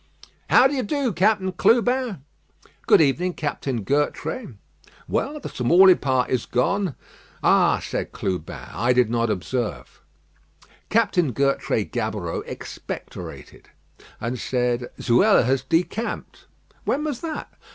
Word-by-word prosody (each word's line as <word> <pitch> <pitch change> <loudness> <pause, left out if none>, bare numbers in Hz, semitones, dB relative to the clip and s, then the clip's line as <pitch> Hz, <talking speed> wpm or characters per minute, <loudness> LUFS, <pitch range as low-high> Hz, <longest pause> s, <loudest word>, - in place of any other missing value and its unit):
"How 255 - +6
d'ye 270 -1 +2
do, 260 0 -1
Captain 190 +1 +2
Clubin?" 240 - +2 0.6
"Good - - +6
evening, 170 +5 +1
Captain 135 -6 -3
Gertrais." 145 - -2 0.5
"Well, 300 +2 -2
the - - -7
Tamaulipas 140 -3 +4
is 125 -3 -1
gone." 180 +6 0 0.5
"Ah!" - - +4
said - - -4
Clubin, 90 -4 -4
"I 120 +2 +2
did 125 -3 +2
not 115 -1 +1
observe." 110 +5 -3 0.9
Captain 200 - +2
Gertrais 140 +3 0
Gaboureau - - -3
expectorated, - - -8 0.5
and 120 +2 -3
said: 125 -1 -1
"Zuela 120 0 +4
has 130 +1 +1
decamped." 165 - -2 0.4
"When 295 - 0
was 295 -5 -3
that?" 320 -2 -5
150 Hz, 110 wpm, -23 LUFS, -, 0.9 s, How